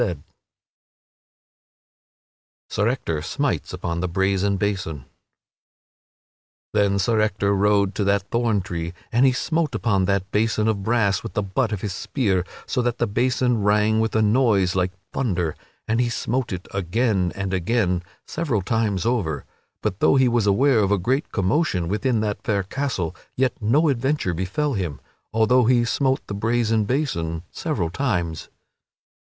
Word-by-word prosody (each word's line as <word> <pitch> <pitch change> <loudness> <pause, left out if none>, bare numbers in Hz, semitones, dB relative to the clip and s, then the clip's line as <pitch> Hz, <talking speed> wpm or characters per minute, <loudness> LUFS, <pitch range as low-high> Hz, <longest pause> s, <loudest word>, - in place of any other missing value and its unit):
[Sidenote: 90 -11 -1 2.5
Sir 105 - +1
Ector 85 - -1
smites - - -2
upon 85 0 -3
the 90 - -1
brazen 95 +2 +1
basin] 90 -9 -2 1.7
Then 100 -2 +2
Sir 110 +3 +2
Ector 100 -1 +1
rode 100 0 +2
to 105 - -1
that 100 0 +1
thorn 115 -4 +1
tree 85 -2 -4 0.2
and 125 +4 +4
he - - +5
smote 155 +1 -1
upon 100 -4 +1
that 100 0 -1
basin 110 0 +1
of 105 -3 0
brass 105 -2 +1
with 115 - -7
the 105 - +1
butt 105 +4 -1
of 105 -3 -3
his 100 -3 -3
spear, 95 -4 0 0.2
so 125 - -1
that 120 -1 -1
the 120 - +1
basin 120 +1 +1
rang 105 +2 +3
with 110 0 0
a 110 - +3
noise 105 -5 +3
like 90 -1 +1 0.2
thunder; 90 - -1 0.3
and 115 +2 +1
he 120 - +1
smote 120 +2 -2
it 95 0 -5
again 100 0 0
and 100 -1 -3
again, 90 -1 +1 0.2
several 130 - -1
times 110 -2 0
over. 100 - -1 0.4
But 105 -2 -2
though - - +4
he 130 -1 +4
was 120 -3 +1
aware 120 +5 +4
of 100 -1 +2
a 105 - +4
great 130 - -1
commotion 95 - +1
within 110 +4 0
that 105 -2 -2
fair 100 -3 0
castle, 100 - -3 0.2
yet 130 -2 +2
no 135 +10 +3
adventure 135 -6 0
befell 95 - -1
him, 85 - -3 0.3
although 115 +3 +3
he 120 0 +4
smote 130 +2 0
the - - -6
brazen 110 +1 +1
basin 85 - -1
several 105 - -2
times. 90 - -2
105 Hz, 155 wpm, -23 LUFS, 95-120 Hz, 2.5 s, he